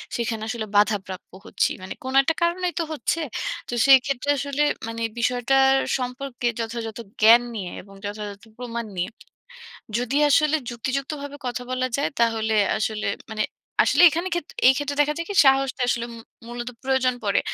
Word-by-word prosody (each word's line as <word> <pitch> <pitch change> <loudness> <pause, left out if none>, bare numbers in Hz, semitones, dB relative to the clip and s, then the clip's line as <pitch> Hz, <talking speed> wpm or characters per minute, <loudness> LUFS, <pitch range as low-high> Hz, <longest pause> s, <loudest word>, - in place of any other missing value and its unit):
সেখানে 225 -2 -2
আসলে 235 -3 -3
বাধাপ্রাপ্য 200 -3 0 0.2
হচ্ছি। - - +1
মানে 185 - -6
কোনো 260 +1 -4
একটা 320 +4 0
কারণেই 355 +1 0
তো - - +1
হচ্ছে। 320 +2 -1 0.5
তো - - -4
সেই 270 -1 +9
ক্ষেত্রে 275 0 -2
আসলে 280 +1 -2 0.3
মানে 230 0 -5 0.2
বিষয়টার 265 +3 +3 0.2
সম্পর্কে 250 -1 -4
যথাযথ 225 -1 -4 0.2
জ্ঞান 230 +2 +8
নিয়ে 190 -5 -5
এবং 195 +1 -16
যথাযথ 205 -1 -6 0.2
প্রমাণ 235 -2 -5
নিয়ে 180 +4 -2 0.9
যদি 250 +3 -2
আসলে 305 +1 +4
যুক্তিযুক্তভাবে 275 +4 -4
কথা 245 0 -3
বলা 255 0 0
যায়, 280 - 0
তাহলে 225 -1 +1 0.2
আসলে 215 -1 -2 0.2
মানে 215 -1 -1 0.4
আসলে 355 - +4
এখানে 340 +4 -2
ক্ষেত্র 345 -3 -4
এই 265 - +8
ক্ষেত্রে 285 -1 -2
দেখা 300 +1 +1
যায় 335 - -4
কি 405 - -3
সাহসটা 270 -1 +3
আসলে 235 -1 0
মু - - -10 0.3
মূলত 240 0 -5
প্রয়োজন 260 -1 +1
পড়ে। 200 -1 +2
250 Hz, 160 wpm, -24 LUFS, 225-275 Hz, 0.9 s, সেই